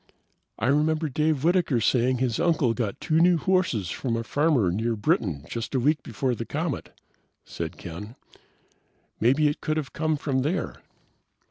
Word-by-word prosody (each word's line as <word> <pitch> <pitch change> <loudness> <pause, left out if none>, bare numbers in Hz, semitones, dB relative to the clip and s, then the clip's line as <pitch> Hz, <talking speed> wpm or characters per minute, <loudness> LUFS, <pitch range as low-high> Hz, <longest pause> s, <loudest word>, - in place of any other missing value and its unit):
"I - - -2
remember 155 +3 +2
Dave 150 0 0
Whitaker 170 -7 +2
saying 125 +3 +2
his 125 -3 0
uncle 150 -9 +2
got 115 -5 -3
two 155 +1 +1
new 175 +1 +5
horses 160 - 0
from 120 -3 -2
a 115 - -2
farmer 140 - +2
near 115 +5 -1
Britton 105 - 0
just 115 +3 -4
a - - +3
week 145 +3 +2
before 125 +2 -2
the 115 - -4
comet," 150 +3 -3 0.6
said - - -6
Ken. 105 +7 -8 1.0
"Maybe 135 +6 +3
it 145 - -2
could 155 0 -1
have 145 -3 -4
come 155 -1 0
from 135 -2 -1
there." 160 +6 -2
135 Hz, 160 wpm, -26 LUFS, 115-155 Hz, 1.0 s, new